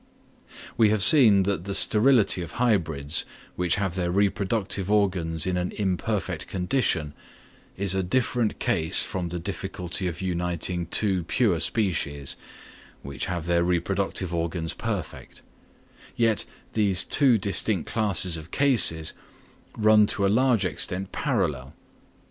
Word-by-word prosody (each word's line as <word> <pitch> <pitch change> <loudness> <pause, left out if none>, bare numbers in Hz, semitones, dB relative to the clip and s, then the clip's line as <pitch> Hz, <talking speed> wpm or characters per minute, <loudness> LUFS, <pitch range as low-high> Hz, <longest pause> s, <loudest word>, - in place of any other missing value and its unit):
We 110 -2 +4
have 105 -2 +2
seen 110 -10 +8
that 95 -3 -2
the 100 -1 -3
sterility 110 -4 +3
of 85 - -8
hybrids 80 - +1 0.3
which 90 -1 0
have 95 -3 -2
their 90 -1 -2
reproductive 100 0 -1
organs 90 -6 0
in 90 -1 -1
an 90 0 -2
imperfect 95 -3 -3
condition, 90 - -1 0.6
is 95 -1 +1
a 95 - 0
different 120 +3 -1
case 80 +3 +1
from 90 -4 -4
the 90 - -5
difficulty 90 +2 -4
of 85 -1 -5
uniting 90 -1 -3
two 95 -4 +1
pure 100 -5 +1
species, 75 - -2 0.7
which 70 -3 -5
have 85 -3 -4
their 85 0 +1
reproductive 90 0 -2
organs 85 -1 -2
perfect; - - -6 0.7
yet 115 -3 0 0.3
these 100 -4 +1
two 135 -5 +3
distinct 100 -2 -1
classes 100 -6 0
of 80 +1 -11
cases 105 - +2 0.6
run 110 -1 +4
to 100 - 0
a - - +2
large 120 -4 +2
extent 90 +3 -3
parallel. 65 -2 -2
95 Hz, 130 wpm, -25 LUFS, 85-105 Hz, 0.7 s, seen